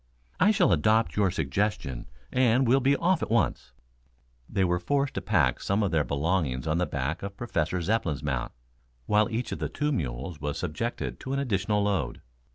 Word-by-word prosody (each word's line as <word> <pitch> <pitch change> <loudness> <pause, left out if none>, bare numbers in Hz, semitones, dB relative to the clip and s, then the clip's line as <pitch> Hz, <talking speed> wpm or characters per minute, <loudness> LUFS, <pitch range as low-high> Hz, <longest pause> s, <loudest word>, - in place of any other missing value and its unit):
I 185 - +5
shall 195 -4 +4
adopt 110 -5 +3
your 100 -2 +3
suggestion 80 - -2 0.2
and 125 0 +3
we'll 130 +3 +5
be 135 +2 +3
off 175 +2 +1
at - - -2
once." 115 -4 0 0.8
They 95 - +1
were 90 -1 +1
forced 140 +7 0
to - - -3
pack 80 - +2
some 100 +2 +1
of 100 - 0
their 80 -3 +2
belongings 70 -3 -1
on 80 +2 0
the 90 - +1
back 70 +3 -2
of 100 0 -6
Professor 90 -7 -1
Zepplin's 85 -8 0
mount, 65 -4 -2 0.5
while 105 +2 +3
each 120 +2 -3
of - - -4
the - - -2
two 150 0 -1
mules 70 - -3
was 75 -1 -2
subjected 90 +8 -3
to 130 - -4
an 140 - 0
additional 105 -5 0
load. 95 -12 -1
100 Hz, 185 wpm, -27 LUFS, 75-120 Hz, 0.8 s, I